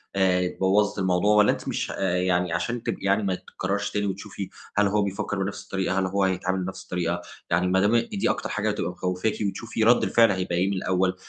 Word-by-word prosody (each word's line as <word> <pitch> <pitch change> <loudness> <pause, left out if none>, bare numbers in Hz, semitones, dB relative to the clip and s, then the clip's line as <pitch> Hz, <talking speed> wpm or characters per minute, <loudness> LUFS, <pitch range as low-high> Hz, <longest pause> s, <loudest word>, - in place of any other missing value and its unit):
آآ 90 -2 +1
بوّظِت 100 +2 +2
الموضوع 95 +3 +2
والّا 105 0 +6
أنتِ - - -5
مش - - -2
ه - - -5
آآ، 90 -2 0
يعني 90 -1 +1
عشان 120 +4 -2
تبقي - - -3
يعني 100 +2 +2
ما 95 -2 0
تتكرّرش 100 +3 -3
تاني 105 0 -1
وتشوفي 100 0 -5 0.3
هل 105 0 +4
هو 105 +1 +1
بيفكّر 100 0 -2
بنَفْس 100 +1 -5
الطريقة، 95 0 -1
هل 95 - +1
هو 95 +1 0
هيتعامل 95 0 0
بنَفْس 95 +1 -6
الطريقة، 90 -1 -2 0.3
يعني 90 +2 +2
ما 95 +1 +3
دام 105 +4 +3
إن 115 - +2
دي 200 -2 0
أكتر - - -2
حاجة 105 +1 -1
هتبقى 105 -3 -2
مخوفاكِ 90 +4 -1
وتشوفي 110 +2 -3
رَد 120 +2 +5
الفِعل 115 -2 +4
هيبقى 90 -2 -2
إيه 90 +2 +2
من - - -1
الأول، 95 0 +1
95 Hz, 225 wpm, -25 LUFS, 90-105 Hz, 0.3 s, والّا